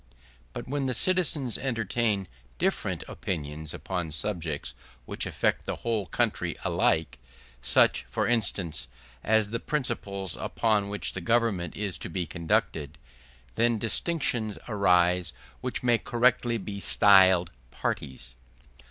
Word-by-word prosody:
But - - -7
when 140 0 -1
the 125 - -1
citizens 155 - +4
entertain 115 -5 0 0.3
different - - -1
opinions 75 -2 -4
upon 90 -4 -4
subjects 80 -3 -1 0.3
which - - -3
affect - - -1
the - - -1
whole 110 -5 0
country - - -1
alike, 75 -6 +1 0.4
such, 60 -1 +3
for - - -1
instance, 95 - -1 0.4
as 110 -1 +2
the 115 - -1
principles 105 - -2
upon 105 -3 0
which 105 0 -2
the 95 - -5
government 100 -4 0
is 100 -3 -2
to - - -5
be 90 +1 -2
conducted, 80 -2 -1 0.6
then 115 - +2
distinctions 115 - -1
arise 90 -4 +2 0.3
which - - -4
may 120 -2 +3
correctly 120 0 +2
be 100 -1 -6
styled 95 -4 +5 0.2
parties. 65 0 -4
100 Hz, 120 wpm, -27 LUFS, 85-115 Hz, 0.6 s, styled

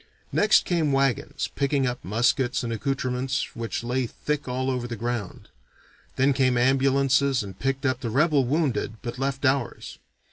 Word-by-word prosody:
Next 215 +1 +4
came 165 -5 +1
wagons, 135 -3 0
picking 140 -1 +1
up 125 -1 -3
muskets 120 +6 +1
and 115 -1 -2
accoutrements 130 +1 -2
which 115 0 -4
lay 125 +1 -1
thick 150 +4 -3
all 130 +1 -1
over 125 -1 -2
the 120 - -5
ground. 115 -3 -4 0.7
Then 135 +2 +3
came 130 -2 +2
ambulances 135 0 +3
and 95 -2 -10
picked 135 +1 -1
up 130 -1 +1
the 125 -4 -3
rebel 145 +3 +3
wounded 130 -5 0
but 120 +1 -5
left 135 +1 -2
ours. 130 -2 -1
130 Hz, 155 wpm, -25 LUFS, 120-140 Hz, 0.7 s, Next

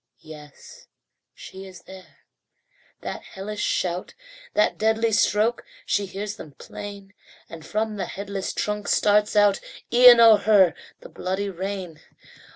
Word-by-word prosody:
Yes, 150 -2 -14 0.5
she 190 +1 -11
is 185 -2 -14
there; 190 -1 -15 0.8
that - - -6
hellish 205 +2 -7
shout, 180 0 -2 0.4
That 210 - +1
deadly 220 +1 +1
stroke, 215 +2 +1 0.2
she 205 -1 -1
hears 205 +3 -6
them 150 -7 -11
plain, 200 +3 -10 0.3
And 165 -1 -11
from 215 +5 -3
the 190 -3 -3
headless 200 -1 -5
trunk 210 0 -3
starts 210 +1 +2
out 205 -1 +4 0.3
Even 245 0 +8
over 225 -3 +7
her 195 -7 +5 0.3
the - - -12
bloody 190 +2 -3
rain. 185 -3 -6
200 Hz, 130 wpm, -23 LUFS, 190-210 Hz, 0.8 s, Even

